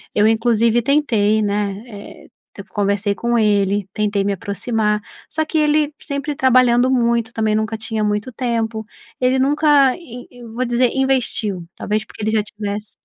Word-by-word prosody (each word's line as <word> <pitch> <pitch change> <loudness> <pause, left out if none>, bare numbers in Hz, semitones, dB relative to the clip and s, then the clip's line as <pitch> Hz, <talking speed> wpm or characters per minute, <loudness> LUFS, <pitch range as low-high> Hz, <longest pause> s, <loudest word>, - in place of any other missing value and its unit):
Eu 210 +1 +4
inclusive 230 +1 +2
tentei, 225 -6 +2
né, 205 0 -2
eh, 205 -3 -11 0.3
eu 200 - -8
conversei 200 0 0
com 235 +3 0
ele, 205 -2 +1
tentei 205 -2 0
me 200 - 0
aproximar, 210 +2 -1 0.3
só 315 0 -1
que 315 - -2
ele 300 -1 +2
sempre 280 0 -4
trabalhando 255 -1 +4
muito, 235 -2 +1
também 215 -1 0
nunca 220 +1 -1
tinha 220 -1 -3
muito 210 +4 -1
tempo. 225 -3 -2 0.4
Ele 255 +1 +2
nunca, 285 -1 +4
in 250 -8 -11
eu 240 -2 -12
vou 250 +2 -1
dizer, 240 0 +2
investiu. 250 -8 0
Talvez 215 +1 -2
porque - - -12
ele 220 - 0
já 215 -1 +1
tivesse 210 -1 -6
225 Hz, 160 wpm, -19 LUFS, 210-255 Hz, 0.4 s, Eu